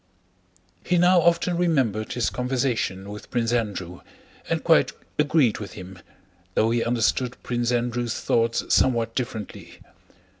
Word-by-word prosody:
He 180 Hz, -, +1 dB
now 175 Hz, +1 st, +5 dB
often 170 Hz, +1 st, +2 dB
remembered 130 Hz, -, 0 dB
his 120 Hz, -, 0 dB
conversation 125 Hz, -6 st, -2 dB
with 105 Hz, -, -10 dB
Prince 120 Hz, -1 st, 0 dB
Andrew 100 Hz, -7 st, -3 dB, 0.5 s
and -, -, -1 dB
quite -, -, +4 dB, 0.3 s
agreed 145 Hz, -6 st, +3 dB
with 100 Hz, -4 st, -7 dB
him, 90 Hz, 0 st, -10 dB, 0.6 s
though 110 Hz, +1 st, +3 dB
he 120 Hz, 0 st, +1 dB
understood 120 Hz, +1 st, 0 dB
Prince 120 Hz, 0 st, -1 dB
Andrew's 120 Hz, -1 st, -1 dB
thoughts 115 Hz, 0 st, +1 dB
somewhat 115 Hz, -3 st, +2 dB
differently. 115 Hz, -4 st, -6 dB
120 Hz, 125 wpm, -24 LUFS, 110-130 Hz, 0.6 s, now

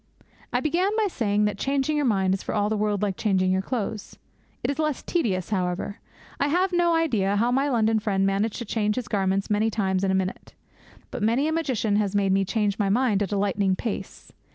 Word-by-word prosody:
I 245 Hz, -, 0 dB
began 345 Hz, +6 st, +1 dB
by 440 Hz, -, +2 dB
saying 210 Hz, -, 0 dB
that 205 Hz, -1 st, -2 dB
changing 275 Hz, +2 st, 0 dB
your 295 Hz, -2 st, +1 dB
mind 190 Hz, -4 st, +2 dB
is 190 Hz, -, -2 dB
for -, -, -4 dB
all 205 Hz, 0 st, +1 dB
the 220 Hz, -, 0 dB
world 210 Hz, -1 st, 0 dB
like 195 Hz, -3 st, -1 dB
changing 190 Hz, -3 st, +1 dB
your 190 Hz, 0 st, +1 dB
clothes. 215 Hz, -1 st, -4 dB, 0.5 s
It -, -, +1 dB
is 285 Hz, -, -6 dB
less 305 Hz, -3 st, -1 dB
tedious, 210 Hz, -, -1 dB
however. 180 Hz, +1 st, -2 dB, 0.4 s
I 285 Hz, -, +2 dB
have 360 Hz, +5 st, +1 dB
no 345 Hz, -1 st, +3 dB
idea 220 Hz, -12 st, +1 dB
how 235 Hz, +4 st, +2 dB
my 270 Hz, +3 st, +1 dB
London 225 Hz, -3 st, +2 dB
friend 195 Hz, -3 st, 0 dB
managed 200 Hz, +3 st, 0 dB
to 235 Hz, -, -5 dB
change 210 Hz, -1 st, 0 dB
his 250 Hz, -3 st, -4 dB
garments 195 Hz, 0 st, 0 dB
many 210 Hz, +2 st, +2 dB
times 190 Hz, -3 st, 0 dB
in 195 Hz, -, +1 dB
a 190 Hz, -, +2 dB
minute. 190 Hz, 0 st, -3 dB, 0.6 s
But 250 Hz, -, -5 dB
many 235 Hz, +7 st, +2 dB
a -, -, 0 dB
magician 255 Hz, -10 st, 0 dB
has 205 Hz, -1 st, 0 dB
made 200 Hz, -1 st, +2 dB
me 195 Hz, 0 st, +3 dB
change 205 Hz, 0 st, -1 dB
my 200 Hz, -2 st, +1 dB
mind 215 Hz, -1 st, +2 dB
at 200 Hz, -, -1 dB
a 205 Hz, -, 0 dB
lightning 195 Hz, -1 st, +1 dB
pace. 200 Hz, -2 st, -6 dB
210 Hz, 225 wpm, -25 LUFS, 195-255 Hz, 0.6 s, no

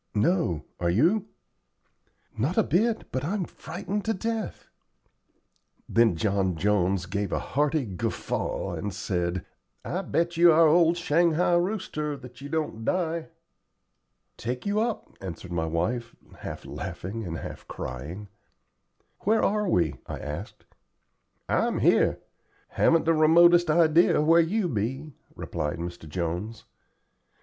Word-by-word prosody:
"No, 105 Hz, -, +1 dB
are 85 Hz, -, +1 dB
you?" 170 Hz, -, +2 dB, 1.1 s
"Not 130 Hz, +11 st, -1 dB
a -, -, +5 dB
bit, 215 Hz, -, 0 dB
but 130 Hz, -, -2 dB
I'm 185 Hz, +4 st, -1 dB
frightened 195 Hz, +6 st, -5 dB
to 225 Hz, 0 st, 0 dB
death." 225 Hz, +2 st, -4 dB, 1.2 s
Then 115 Hz, -5 st, +3 dB
John 95 Hz, 0 st, 0 dB
Jones 95 Hz, 0 st, +1 dB
gave 100 Hz, +1 st, -3 dB
a -, -, 0 dB
hearty 150 Hz, 0 st, 0 dB
guffaw 95 Hz, -5 st, -3 dB
and 105 Hz, -, -3 dB
said: 90 Hz, -1 st, -2 dB, 0.4 s
"I 180 Hz, -, -2 dB
bet 170 Hz, -2 st, -1 dB
you 170 Hz, 0 st, +7 dB
our 165 Hz, +1 st, +6 dB
old 165 Hz, +2 st, +4 dB
shanghai 170 Hz, +1 st, +2 dB
rooster 175 Hz, -5 st, -1 dB
that 125 Hz, 0 st, -13 dB
you 140 Hz, -, -7 dB
don't 150 Hz, -8 st, -2 dB
die." 165 Hz, +1 st, -1 dB, 1.1 s
"Take 125 Hz, +2 st, -4 dB
you 205 Hz, +1 st, +1 dB
up," 225 Hz, 0 st, -2 dB
answered 95 Hz, -1 st, -7 dB
my 80 Hz, -2 st, -1 dB
wife, 115 Hz, +9 st, -2 dB, 0.2 s
half -, -, -7 dB
laughing 105 Hz, +5 st, -5 dB
and 85 Hz, -4 st, -4 dB
half -, -, -8 dB
crying. 75 Hz, +12 st, -6 dB, 0.9 s
"Where 220 Hz, +3 st, +2 dB
are 210 Hz, -1 st, +1 dB
we?" 80 Hz, -, +1 dB
I -, -, -5 dB
asked. 75 Hz, +1 st, -7 dB, 0.8 s
"I'm -, -, +1 dB
here. -, -, +3 dB, 0.5 s
Haven't 165 Hz, 0 st, +3 dB
the 165 Hz, -, +4 dB
remotest 170 Hz, +2 st, +6 dB
idea 165 Hz, +1 st, +4 dB
where 165 Hz, +3 st, +5 dB
you 190 Hz, +4 st, 0 dB
be," 135 Hz, +4 st, -3 dB, 0.2 s
replied 75 Hz, -, -3 dB
Mr. 85 Hz, -2 st, -7 dB
Jones. 90 Hz, +7 st, -3 dB
145 Hz, 130 wpm, -27 LUFS, -, 1.2 s, you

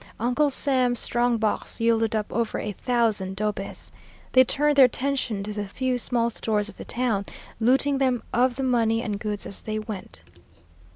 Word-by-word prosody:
Uncle 250 Hz, +6 st, +2 dB
Sam's 255 Hz, -3 st, +2 dB
strong 240 Hz, 0 st, +1 dB
box 220 Hz, +1 st, -1 dB
yielded 225 Hz, -1 st, +2 dB
up 215 Hz, -1 st, 0 dB
over 230 Hz, 0 st, -1 dB
a 210 Hz, -, -3 dB
thousand 215 Hz, -4 st, 0 dB
dobes. 205 Hz, -1 st, -4 dB, 0.4 s
They 255 Hz, -, +7 dB
turned 295 Hz, +3 st, +1 dB
their 270 Hz, -, +9 dB
attention 250 Hz, -5 st, -1 dB
to 210 Hz, +1 st, -5 dB
the 205 Hz, -1 st, -4 dB
few 255 Hz, +4 st, -1 dB
small 235 Hz, -1 st, 0 dB
stores 210 Hz, -2 st, -1 dB
of -, -, -13 dB
the -, -, -8 dB
town, 230 Hz, -5 st, -1 dB, 0.3 s
looting 270 Hz, +4 st, +3 dB
them 255 Hz, -3 st, +1 dB
of 245 Hz, +1 st, +2 dB
the 270 Hz, -, -3 dB
money 230 Hz, -3 st, +1 dB
and 210 Hz, -4 st, -3 dB
goods 210 Hz, -2 st, -4 dB
as 200 Hz, -, -7 dB
they 215 Hz, 0 st, -4 dB
went. 210 Hz, -, -6 dB
230 Hz, 175 wpm, -25 LUFS, 210-255 Hz, 0.4 s, their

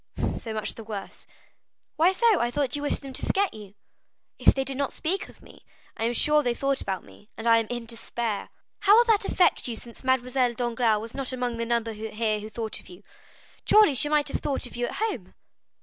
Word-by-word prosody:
"So 225 Hz, -, -7 dB
much 215 Hz, -1 st, -2 dB
the 225 Hz, -, -9 dB
worse." 210 Hz, -2 st, -8 dB, 0.7 s
"Why 330 Hz, +4 st, +5 dB
so? 440 Hz, 0 st, +3 dB
I 240 Hz, -, +1 dB
thought 265 Hz, +1 st, -1 dB
you 290 Hz, -, -3 dB
wished 290 Hz, -, -1 dB
them 270 Hz, -1 st, -8 dB
to -, -, -6 dB
forget 395 Hz, 0 st, +1 dB
you?" 205 Hz, -2 st, -11 dB, 0.6 s
"If -, -, +5 dB
they 270 Hz, -, 0 dB
did 270 Hz, 0 st, -4 dB
not 280 Hz, 0 st, -1 dB
speak 375 Hz, +4 st, -2 dB
of -, -, -18 dB
me, -, -, -16 dB, 0.3 s
I 225 Hz, -, -2 dB
am 235 Hz, -, +1 dB
sure 300 Hz, +5 st, +3 dB
they 245 Hz, -4 st, 0 dB
thought 275 Hz, +1 st, 0 dB
about 190 Hz, -2 st, -3 dB
me, 205 Hz, -, -18 dB
and 225 Hz, -, -7 dB
I 230 Hz, -1 st, +6 dB
am 225 Hz, -, -3 dB
in 240 Hz, -1 st, -4 dB
despair." 230 Hz, -2 st, -4 dB, 0.3 s
"How 410 Hz, +2 st, +6 dB
will 475 Hz, -, +7 dB
that 440 Hz, -4 st, +3 dB
affect 360 Hz, -8 st, +2 dB
you, 235 Hz, -, -3 dB
since 235 Hz, +2 st, -11 dB
Mademoiselle 255 Hz, -1 st, +1 dB
Danglars 235 Hz, -3 st, +1 dB
was 225 Hz, +1 st, -8 dB
not 270 Hz, -1 st, -3 dB
among 245 Hz, -2 st, -2 dB
the 230 Hz, 0 st, -2 dB
number 230 Hz, -1 st, 0 dB
here 215 Hz, 0 st, -2 dB
who 215 Hz, +1 st, -7 dB
thought 220 Hz, -1 st, -4 dB
of -, -, -15 dB
you? 180 Hz, +3 st, -13 dB, 0.6 s
Truly, 425 Hz, -8 st, +6 dB
she 295 Hz, +3 st, +2 dB
might 300 Hz, -1 st, +2 dB
have -, -, -2 dB
thought 280 Hz, -3 st, -1 dB
of 245 Hz, -, -7 dB
you 240 Hz, 0 st, -1 dB
at -, -, -6 dB
home." 270 Hz, -, -3 dB
245 Hz, 230 wpm, -26 LUFS, 225-290 Hz, 0.7 s, will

